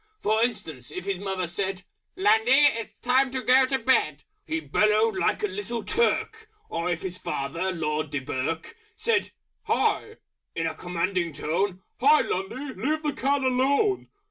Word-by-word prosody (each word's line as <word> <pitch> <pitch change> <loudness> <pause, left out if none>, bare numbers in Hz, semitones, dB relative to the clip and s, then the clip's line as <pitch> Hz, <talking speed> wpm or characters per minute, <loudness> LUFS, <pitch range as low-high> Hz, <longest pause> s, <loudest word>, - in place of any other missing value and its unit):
For 220 +1 +1
instance 155 - -3
if 180 +4 -6
his 195 -2 -2
Mother 190 -2 -2
said, 190 +2 -3 0.3
"Lundy! 220 +4 +3 0.2
It's 230 -1 -6
time 260 +2 +3
to 260 0 -4
go 260 +1 +5
to 265 - +1
Bed!" 260 0 +1 0.2
He 320 +1 -1
bellowed 215 -6 +2
like 210 +3 0
a - - +3
Little 205 +4 -4
Turk. 450 -1 0 0.2
Or 170 +2 -1
if 175 -2 -2
his 185 -1 -4
father 165 +7 -2
Lord 155 -3 -2
Dunquerque 140 - -3 0.2
Said 455 +1 +1 0.4
"Hi!" 440 - +1 0.4
in 165 - -1
a 160 - -1
Commanding 175 -1 -2
Tone, 185 +6 -1 0.2
"Hi, 295 +4 +6
Lundy! 255 +9 -3
Leave 310 +3 0
the 300 -1 0
Cat 275 +1 0
alone!" 275 - +2
205 Hz, 155 wpm, -26 LUFS, 175-260 Hz, 0.4 s, Hi